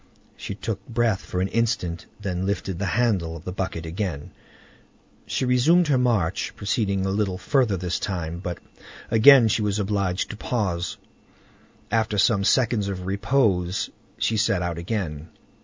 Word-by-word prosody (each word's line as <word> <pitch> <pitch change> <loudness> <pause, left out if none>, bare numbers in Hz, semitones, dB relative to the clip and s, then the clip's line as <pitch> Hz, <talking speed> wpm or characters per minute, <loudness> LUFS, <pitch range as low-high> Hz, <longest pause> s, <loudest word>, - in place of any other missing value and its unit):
She 100 - -6
took 105 +1 -4
breath 115 -4 +1
for 90 - -3
an 95 - +1
instant, 110 -7 -1
then 95 -2 -2
lifted 95 -3 -2
the 100 - -1
handle 95 -9 +1
of 85 - -9
the 90 - -5
bucket 95 -3 -4
again, 80 -3 -4 1.0
and - - -1
resumed 150 +7 +4
her 135 - +4
march, 115 -10 0
proceeding 100 -2 0
a 95 - 0
little 100 -2 0
further 120 -3 +1
this 90 0 -2
time, 85 -4 -3
but 90 -2 -4 0.5
again 120 +2 +8
she 110 - +1
was 105 -1 0
obliged 100 -3 -1
to 105 - -8
pause. 95 -8 -2 0.9
After 110 -1 +1
some 100 0 +3
seconds 115 -2 +2
of 95 -2 -4
repose 100 -3 +1 0.3
she 110 - 0
set 100 -4 +1
out 85 -1 -3
again. 85 -5 -4
100 Hz, 155 wpm, -24 LUFS, 90-115 Hz, 1.0 s, again